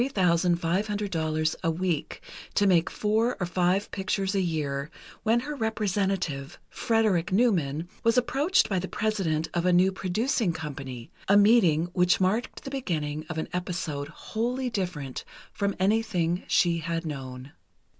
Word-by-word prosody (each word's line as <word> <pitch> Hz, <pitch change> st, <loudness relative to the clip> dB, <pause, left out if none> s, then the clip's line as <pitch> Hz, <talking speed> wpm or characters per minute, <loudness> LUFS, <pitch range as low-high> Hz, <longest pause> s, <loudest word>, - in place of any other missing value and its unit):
00 180 Hz, -, +1 dB, 0.2 s
a 165 Hz, -, +2 dB
week, 170 Hz, -2 st, -2 dB, 0.3 s
to 205 Hz, -, +3 dB
make 175 Hz, -4 st, +4 dB
four 220 Hz, +3 st, 0 dB
or 180 Hz, -, 0 dB
five 180 Hz, +3 st, +1 dB
pictures 195 Hz, 0 st, -1 dB
a 195 Hz, -, +2 dB
year, 150 Hz, -5 st, -2 dB, 0.3 s
when 230 Hz, +2 st, +2 dB
her 295 Hz, +4 st, -5 dB
representative, 195 Hz, -, -1 dB
Frederick 215 Hz, -6 st, +1 dB
Newman, 175 Hz, -, +1 dB, 0.2 s
was 230 Hz, +1 st, +3 dB
approached 280 Hz, +9 st, +3 dB
by 190 Hz, -3 st, 0 dB
the 185 Hz, -, -4 dB
president 190 Hz, -8 st, -1 dB
of 175 Hz, -, 0 dB
a 180 Hz, -, +3 dB
new 180 Hz, +2 st, +4 dB
producing 195 Hz, +2 st, 0 dB
company, 135 Hz, -6 st, -7 dB, 0.2 s
a 200 Hz, +1 st, +6 dB
meeting 200 Hz, -7 st, +5 dB
which 180 Hz, 0 st, +3 dB
marked 200 Hz, +6 st, 0 dB
the 270 Hz, -, -6 dB
beginning 155 Hz, -, -2 dB
of 160 Hz, -, -4 dB
an 160 Hz, -, -2 dB
episode 175 Hz, -5 st, -3 dB
wholly 245 Hz, -, -3 dB
different 175 Hz, -, -3 dB, 0.3 s
from 200 Hz, -1 st, -1 dB
anything 190 Hz, -4 st, +1 dB
she 170 Hz, -1 st, +3 dB
had 165 Hz, +1 st, -3 dB
known. 135 Hz, -2 st, -6 dB
180 Hz, 140 wpm, -27 LUFS, 160-215 Hz, 0.3 s, a